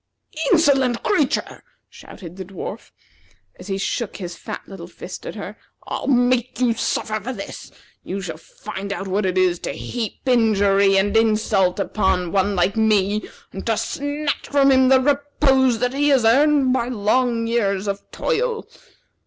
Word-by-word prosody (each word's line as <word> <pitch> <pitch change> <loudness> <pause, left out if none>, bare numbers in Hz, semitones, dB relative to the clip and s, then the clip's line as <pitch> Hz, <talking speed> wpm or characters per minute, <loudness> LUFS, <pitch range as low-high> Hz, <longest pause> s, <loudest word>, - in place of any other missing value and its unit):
"Insolent 270 -8 +3
creature!" 305 -10 0 0.3
shouted 175 -3 -12
the 190 - -6
dwarf, 195 +4 -8 0.7
as 180 - -10
he 195 -1 -2
shook 210 +3 -3
his 175 -3 -6
fat - - -7
little 180 -3 -10
fist - - -9
at - - -6
her. - - -7 0.3
"I'll - - -4
make 245 -2 +2
you 245 -2 +3
suffer 215 -1 -2
for 245 +6 -4
this. 255 - -8 0.3
You 195 - -5
shall 170 -5 -6
find 200 +3 -8
out 195 -1 -4
what 190 +1 0
it 185 0 -1
is 180 -2 +2
to - - -4
heap 230 -4 -5
injury 200 -5 +3
and 205 +2 +1
insult 215 -4 +2
upon 190 -4 0
one 200 0 +1
like 180 +2 +1
me, 215 -2 +1 0.2
and 195 - -6
to 225 -2 +1
snatch 285 +6 -3
from 275 -1 +4
him 260 -1 +5
the 265 0 +6
repose 275 -3 +2
that 250 +2 -1
he 290 +2 +2
has 265 -5 +3
earned 275 +2 +4
by 240 -2 0
long 235 +1 +1
years 205 -4 0
of 200 0 -2
toil." 475 -1 -1
225 Hz, 160 wpm, -21 LUFS, 195-260 Hz, 0.7 s, the